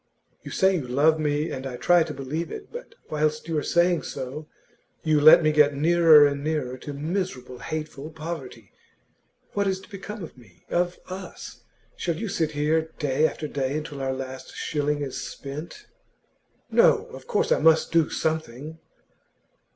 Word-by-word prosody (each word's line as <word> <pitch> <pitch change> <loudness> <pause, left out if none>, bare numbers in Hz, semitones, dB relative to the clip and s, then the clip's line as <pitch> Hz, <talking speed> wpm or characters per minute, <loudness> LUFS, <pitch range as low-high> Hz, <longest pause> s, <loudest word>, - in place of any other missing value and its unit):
You - - -9
say 190 0 +3
you 140 -6 -5
love 150 +5 +3
me, 150 +1 0
and 130 0 -4
I 125 -2 -6
try 175 +4 +4
to - - -1
believe 150 +5 -4
it. - - -8
But 485 0 -9 0.2
whilst 155 +1 0
you 165 - -2
are - - -3
saying 170 0 +2
so, 140 +4 -6 0.6
you 155 -2 +3
let 155 +2 +9
me 155 - +4
get 150 -1 +4
nearer 160 0 +6
and 140 0 -1
nearer 150 -5 -2
to 145 - -7
miserable, 145 -5 -4
hateful 155 -2 -5
poverty. 155 -8 -7 0.8
What 200 -1 0
is 190 -1 0
to - - -16
become 205 +1 -7
of 165 - -9
me 110 -9 -20
of 175 0 0
us? 190 +1 -8 0.3
Shall 170 -2 -2
you 210 +6 -4
sit 160 -5 -1
here 155 +2 +1
day 150 +1 +2
after 155 - -5
day 140 0 -2
until 150 -2 -6
our 135 0 -1
last 130 0 -7
shilling 145 -1 -1
is 135 -2 -5
spent?' 150 +4 -8 0.9
'No; - - +5
of - - -11
course - - 0
I - - +4
must 160 +1 +4
do 165 -2 +3
something. 155 0 -3
155 Hz, 170 wpm, -25 LUFS, 140-165 Hz, 0.9 s, let